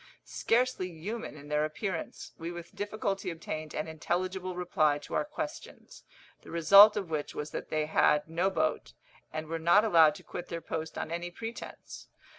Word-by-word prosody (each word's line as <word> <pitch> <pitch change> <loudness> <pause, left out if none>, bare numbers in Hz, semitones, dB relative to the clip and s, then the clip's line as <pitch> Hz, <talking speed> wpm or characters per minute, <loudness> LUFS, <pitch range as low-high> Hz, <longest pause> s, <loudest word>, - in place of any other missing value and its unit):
Scarcely 240 -5 +1
human 190 +2 -6
in 145 0 -12
their 150 0 +1
appearance, 165 +3 -4
we 165 +1 -4
with 170 +1 -9
difficulty 205 -1 -2
obtained 155 -2 -6
an 155 - -2
intelligible 180 +3 -2
reply 155 -5 +2
to 145 - -10
our - - +2
questions, 305 +1 -7 0.4
the - - -14
result 200 +6 +8
of 190 -5 -3
which 150 -2 -3
was 150 0 -4
that - - -5
they 155 -1 0
had 150 -1 +3
no 170 +4 +1
boat, 155 -4 -1 0.4
and 155 0 -4
were 165 +1 -4
not 175 +7 +5
allowed 165 -6 +6
to 185 - -12
quit 175 0 -7
their 170 - -4
post 160 -1 -5
on 160 - -4
any 170 +1 -3
pretence. 225 +6 -8
170 Hz, 175 wpm, -30 LUFS, 155-195 Hz, 0.4 s, result